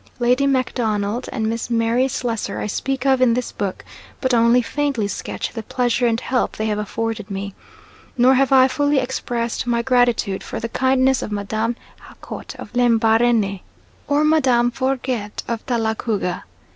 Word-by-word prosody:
Lady 250 Hz, +3 st, +2 dB
MacDonald 235 Hz, -4 st, -1 dB
and 220 Hz, -4 st, -1 dB
Miss 230 Hz, +1 st, -3 dB
Mary 230 Hz, +2 st, +2 dB
Slessor 240 Hz, -4 st, -3 dB
I -, -, -3 dB
speak 265 Hz, +5 st, -2 dB
of 265 Hz, -1 st, +3 dB
in 235 Hz, -2 st, +4 dB
this 250 Hz, 0 st, -2 dB
book, 195 Hz, -2 st, -4 dB, 0.3 s
but 260 Hz, -2 st, 0 dB
only 235 Hz, +1 st, +4 dB
faintly 275 Hz, -5 st, -1 dB
sketch -, -, -5 dB
the 225 Hz, -, -4 dB
pleasure 245 Hz, +2 st, 0 dB
and 230 Hz, -1 st, +1 dB
help 255 Hz, 0 st, -1 dB
they 220 Hz, -, -1 dB
have 210 Hz, -1 st, -1 dB
afforded 220 Hz, 0 st, -3 dB
me; 200 Hz, 0 st, -5 dB, 0.6 s
nor 250 Hz, +2 st, +5 dB
have 270 Hz, +1 st, +2 dB
I 260 Hz, -1 st, +7 dB
fully 285 Hz, +2 st, +1 dB
expressed 245 Hz, -2 st, -2 dB
my 235 Hz, -1 st, +1 dB
gratitude 245 Hz, -6 st, +2 dB
for -, -, -6 dB
the 230 Hz, +1 st, -4 dB
kindness 260 Hz, +1 st, +2 dB
of -, -, -5 dB
Madame 220 Hz, +3 st, -2 dB, 0.3 s
Jacot -, -, -9 dB
of -, -, -10 dB
Lembarene, 225 Hz, -3 st, +3 dB, 0.5 s
or 290 Hz, +1 st, +2 dB
Madame 260 Hz, -6 st, +3 dB
Forget 255 Hz, -5 st, -2 dB
of 230 Hz, -1 st, -3 dB
Talagouga. 220 Hz, -5 st, -1 dB
240 Hz, 160 wpm, -21 LUFS, 220-260 Hz, 0.6 s, I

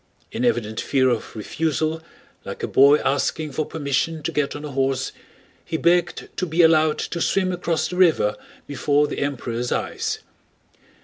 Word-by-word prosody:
In 120 Hz, -, -3 dB
evident 115 Hz, -3 st, 0 dB
fear 130 Hz, -2 st, +2 dB
of 120 Hz, -2 st, -3 dB
refusal, 155 Hz, +7 st, -1 dB, 0.4 s
like -, -, -7 dB
a -, -, 0 dB
boy 140 Hz, +2 st, +6 dB
asking 150 Hz, +2 st, 0 dB
for 150 Hz, +3 st, -2 dB
permission 155 Hz, +1 st, -2 dB
to -, -, -2 dB
get 145 Hz, -2 st, -1 dB
on 145 Hz, +1 st, -6 dB
a 150 Hz, -, -6 dB
horse, 135 Hz, -1 st, 0 dB, 0.5 s
he 160 Hz, -, -3 dB
begged 175 Hz, +1 st, +1 dB
to 185 Hz, -, -1 dB
be 165 Hz, +2 st, +3 dB
allowed 155 Hz, -1 st, +4 dB
to 170 Hz, -, -4 dB
swim 185 Hz, +1 st, +1 dB
across 165 Hz, -3 st, -1 dB
the 180 Hz, -, -6 dB
river 160 Hz, -, +3 dB, 0.3 s
before 145 Hz, +1 st, +1 dB
the -, -, -4 dB
Emperor's 125 Hz, -4 st, -3 dB
eyes. -, -, -2 dB
150 Hz, 165 wpm, -22 LUFS, 135-160 Hz, 0.5 s, boy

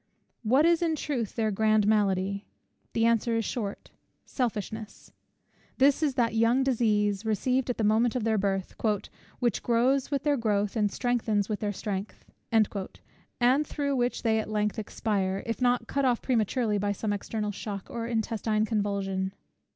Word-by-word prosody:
What 255 Hz, +7 st, +4 dB
is 340 Hz, 0 st, +4 dB
in 330 Hz, -2 st, +1 dB
truth 255 Hz, -8 st, -3 dB
their 220 Hz, -2 st, +1 dB
grand 215 Hz, +1 st, +3 dB
malady? 200 Hz, -1 st, +1 dB, 0.5 s
The 225 Hz, -, +2 dB
answer 230 Hz, 0 st, +2 dB
is 225 Hz, -, -1 dB
short; 205 Hz, -5 st, -4 dB, 0.3 s
Selfishness. 220 Hz, -3 st, -4 dB, 0.6 s
This 275 Hz, +2 st, +4 dB
is 290 Hz, -4 st, +1 dB
that 235 Hz, -4 st, +1 dB
young 230 Hz, +4 st, +3 dB
disease 210 Hz, -5 st, +1 dB
received 250 Hz, +4 st, 0 dB
at 245 Hz, -, -1 dB
the 225 Hz, -, -1 dB
moment 220 Hz, +3 st, +3 dB
of 250 Hz, -, -1 dB
their 220 Hz, -1 st, +2 dB
birth, 195 Hz, -1 st, -1 dB, 0.6 s
"which 240 Hz, -5 st, 0 dB
grows 250 Hz, +3 st, +2 dB
with 280 Hz, -2 st, -1 dB
their 290 Hz, -1 st, +2 dB
growth, 210 Hz, -3 st, 0 dB
and 210 Hz, -3 st, +1 dB
strengthens 225 Hz, -4 st, 0 dB
with 210 Hz, -, -2 dB
their 205 Hz, -1 st, -1 dB
strength;" 200 Hz, 0 st, -5 dB, 0.3 s
and 230 Hz, +5 st, 0 dB
through 280 Hz, -2 st, -1 dB
which 245 Hz, -1 st, -1 dB
they 220 Hz, -1 st, +2 dB
at 215 Hz, -, -4 dB
length 210 Hz, 0 st, -1 dB
expire, 200 Hz, -3 st, -1 dB
if 230 Hz, +2 st, -3 dB
not 245 Hz, 0 st, +2 dB
cut 280 Hz, -, -1 dB
off 245 Hz, -3 st, +2 dB
prematurely 225 Hz, -3 st, 0 dB
by 205 Hz, 0 st, 0 dB
some 205 Hz, +1 st, -2 dB
external 210 Hz, +1 st, -3 dB
shock 200 Hz, -1 st, -6 dB
or 230 Hz, -1 st, -4 dB
intestine 220 Hz, -1 st, 0 dB
convulsion. 200 Hz, -3 st, -1 dB
220 Hz, 160 wpm, -28 LUFS, 205-245 Hz, 0.6 s, What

